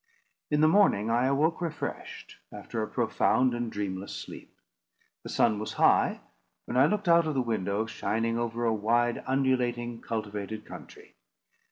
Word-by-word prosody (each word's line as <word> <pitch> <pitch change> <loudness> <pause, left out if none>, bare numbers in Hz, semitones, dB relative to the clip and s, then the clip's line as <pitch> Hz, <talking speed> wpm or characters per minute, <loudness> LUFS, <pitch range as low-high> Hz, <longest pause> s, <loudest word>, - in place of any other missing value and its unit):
In 150 0 +2
the 155 - +6
morning 155 - +3
I 120 +2 +2
awoke 155 +6 +1
refreshed, 165 -3 -6
after - - -5
a - - -2
profound 130 -1 +1
and 120 -1 -3
dreamless 100 -1 -4
sleep. - - -9 0.7
The - - -9
sun 110 -3 +2
was 110 - -5
high, - - +3 0.4
when - - -5
I 130 +3 +5
looked 205 +1 -2
out 170 -1 +5
of 155 - -2
the 130 - +2
window, 110 -2 -1
shining 115 +1 -2
over 120 0 -2
a 115 - +2
wide, 120 +3 +1
undulating, 125 -3 0
cultivated 105 -1 -5
country. - - -12
120 Hz, 155 wpm, -28 LUFS, 110-135 Hz, 0.7 s, the